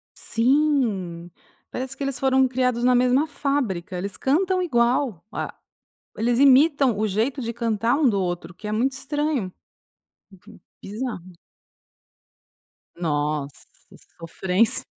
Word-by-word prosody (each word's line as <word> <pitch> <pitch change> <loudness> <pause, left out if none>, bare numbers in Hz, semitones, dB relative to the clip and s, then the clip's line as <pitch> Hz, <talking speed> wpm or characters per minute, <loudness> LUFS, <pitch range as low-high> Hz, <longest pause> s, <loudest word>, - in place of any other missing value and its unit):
Sim, 230 - 0 0.4
parece 260 +1 -5
que 280 - -5
eles 275 -2 -3
foram 265 -1 +3
criados 250 -1 0
na 250 0 +4
mesma 255 +5 +3
fábrica, 235 - -2
eles 195 +2 -5
cantam 365 +7 +1
igual, 240 - +1
a - - -4 0.6
eles 235 +2 +1
imitam 275 -3 +5
o 215 - 0
jeito 230 +7 -1
de 230 0 -3
cantar 230 +2 0
um 300 -4 +3
do 200 -2 0
outro 175 0 -4
o - - -39
que 210 +3 -9
é - - -3
muito 255 +5 +1
estranho. 275 -6 -2 1.0
Uhum. - - -14 0.2
Bizarro. 195 -5 -6 1.6
Nossa 150 -3 -2 0.5
sofrência. 185 +6 +1
240 Hz, 125 wpm, -23 LUFS, 190-270 Hz, 1.6 s, imitam